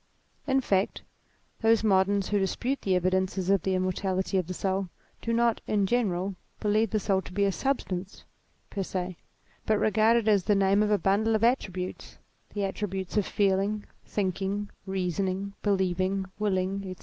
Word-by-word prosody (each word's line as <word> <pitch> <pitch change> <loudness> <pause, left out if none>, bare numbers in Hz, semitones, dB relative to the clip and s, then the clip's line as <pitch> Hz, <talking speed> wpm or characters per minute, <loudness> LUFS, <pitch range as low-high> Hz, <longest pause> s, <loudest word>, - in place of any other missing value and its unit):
In 270 -1 +3
fact, 195 -5 0 0.6
those 225 -1 +4
moderns 195 -1 +3
who 205 - +2
dispute 245 +8 -1
the 190 -2 +1
evidences 185 +1 +1
of 200 -3 +3
the 190 +2 0
immortality 185 +1 -1
of 180 - -3
the 185 - -3
soul, 190 0 -1 0.3
do 230 - -2
not, 235 0 +2
in 205 -2 +2
general, 195 -4 0 0.3
believe 215 +1 +2
the 215 - 0
soul 195 -1 +1
to - - -11
be 200 +2 +1
a 195 - +2
substance 195 -7 -3 0.5
per 200 - -2
se, 185 -1 -3 0.5
but 215 - +3
regard 220 +2 +4
it 225 -2 0
as 205 -4 +4
the 205 - +3
name 195 +1 +3
of 210 - +2
a 210 - +4
bundle 210 +3 +2
of 215 - 0
attributes, 190 -7 -1 0.4
the 205 - -1
attributes 190 -1 -3
of 210 -2 +2
feel 195 -2 +2
ing, 205 +1 -2 0.2
thinking, 200 +1 -2 0.2
reasoning, 190 +1 -2
believing, 190 -1 +1
willing, 195 -1 0
&c. 185 -2 -6
195 Hz, 170 wpm, -28 LUFS, 190-210 Hz, 0.6 s, those